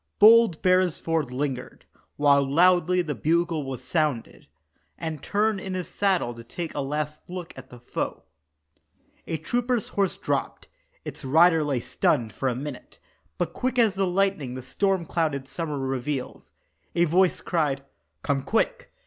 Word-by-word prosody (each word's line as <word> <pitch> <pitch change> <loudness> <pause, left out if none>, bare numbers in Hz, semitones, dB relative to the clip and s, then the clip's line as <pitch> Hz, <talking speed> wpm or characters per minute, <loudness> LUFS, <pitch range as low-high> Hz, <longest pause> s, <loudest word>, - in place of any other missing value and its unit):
Bold 220 -5 +6
Beresford 170 -5 +2
lingered, 130 -1 -4 0.3
while 140 -1 +4
loudly 180 +4 +3
the 155 -3 -3
bugle 165 0 0
was 135 -2 -6
sounded, 150 -8 -2 0.5
And 160 -4 -5
turned 210 0 +1
in 190 0 -5
his 180 -1 -4
saddle 190 -11 0
to 115 0 -11
take 165 +8 -6
a - - -4
last 150 +2 -3
look 180 -1 -6
at 130 0 -11
the 125 - -12
foe. - - -4 1.0
A 165 - -2
trooper's 240 - -1
horse 195 -2 0
dropped; - - -3 0.4
its - - -7
rider 160 +4 +5
lay 140 -5 -1
stunned 120 -2 0
for 135 - -1
a 125 - -2
minute 135 0 -7 0.4
But 170 -1 -2
quick 255 0 -2
as 225 -5 +4
the 195 0 0
lightning 180 -8 0
the 130 - -7
storm 190 +5 0
cloud 160 -3 0
in 135 -1 -6
summer 150 +1 -4
reveals, 135 0 -4 0.4
A 175 - +4
voice 180 +3 +3
cried, 145 -6 -1 0.4
"Come, 140 -1 0
quick! - - -1
160 Hz, 155 wpm, -25 LUFS, 140-185 Hz, 1.0 s, Bold